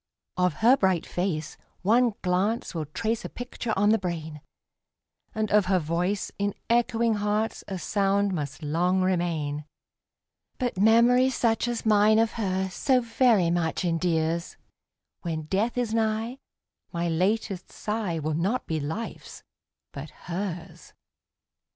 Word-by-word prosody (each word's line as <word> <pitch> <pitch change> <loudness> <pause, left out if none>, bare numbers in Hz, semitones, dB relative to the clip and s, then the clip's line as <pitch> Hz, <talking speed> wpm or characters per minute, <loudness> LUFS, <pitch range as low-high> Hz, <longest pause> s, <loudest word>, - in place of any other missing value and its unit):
Of 180 -2 +2
her 250 +3 +8
bright 190 -6 +1
face 170 -4 -3 0.3
one 230 +2 +3
glance 190 +5 0
will 160 -4 -3
trace 225 +8 -2
a - - -5
picture 245 -1 -5
on 205 +2 +4
the 220 +1 +4
brain, 160 -5 -5 0.9
And 215 -1 -1
of 210 -2 +4
her 190 0 +3
voice 175 +5 -1
in 200 0 -1 0.2
echoing 235 -1 +2
hearts 210 +2 -1
a 190 - -4
sound 200 +3 +1
must 145 -3 -4
long 175 +5 +1
remain; 165 -5 -1 0.9
But 245 -4 -2
memory 235 +4 +5
such 230 -2 +1
as 240 -1 -3
mine 215 0 +5
of 225 0 +3
her 190 -3 -1
so 260 +7 +2
very 230 -6 +3
much 170 +1 0
endears, 165 -1 0 0.6
When 160 -3 -3
death 200 +10 -1
is 240 -3 0
nigh 225 +3 -1 0.5
my 170 -1 -1
latest 185 +3 -1
sigh 210 -6 -3
will 155 0 -2
not 190 +11 0
be 160 -1 -2
life's 160 +10 -6 0.5
but 140 +2 -7
hers. 175 -1 -6
195 Hz, 135 wpm, -26 LUFS, 170-225 Hz, 0.9 s, her